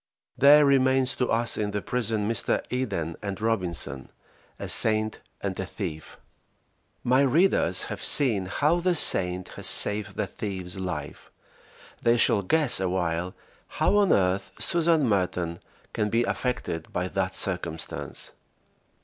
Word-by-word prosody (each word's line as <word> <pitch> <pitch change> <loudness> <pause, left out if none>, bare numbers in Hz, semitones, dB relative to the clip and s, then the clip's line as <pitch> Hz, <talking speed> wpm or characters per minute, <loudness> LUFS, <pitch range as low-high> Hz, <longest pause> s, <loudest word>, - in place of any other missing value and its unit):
There 145 +2 +6
remains 130 -1 +2
to 125 - -1
us 115 +1 +2
in 105 -1 -1
the 105 0 -3
prison 110 -4 -2
Mr. 115 - -1
Eden 100 -11 -3
and 100 -2 -5
Robinson, 90 -11 -3 0.5
a - - -7
saint 110 0 +1 0.2
and 95 -2 -4
a 95 - -3
thief. 85 -7 -7 0.9
My 130 +2 +3
readers 140 - +2
have - - -7
seen 110 -10 +5
how 150 - +1
the 180 0 0
saint 90 - +4
has - - -3
saved 105 -1 +2
the - - -2
thief's 95 -4 -6
life. 95 -1 -6 0.7
They 120 0 +2
shall 105 - +3
guess 140 - +3
awhile 90 -1 -2 0.4
how 205 - +2
on 200 -2 +3
earth 95 0 0
Susan 165 -4 +1
Merton 90 -4 -1 0.3
can 105 - -1
be 115 +3 +1
affected 120 -10 -4
by 90 +1 -2
that 95 -1 -2
circumstance. 85 -4 -3
105 Hz, 135 wpm, -25 LUFS, 90-125 Hz, 0.9 s, There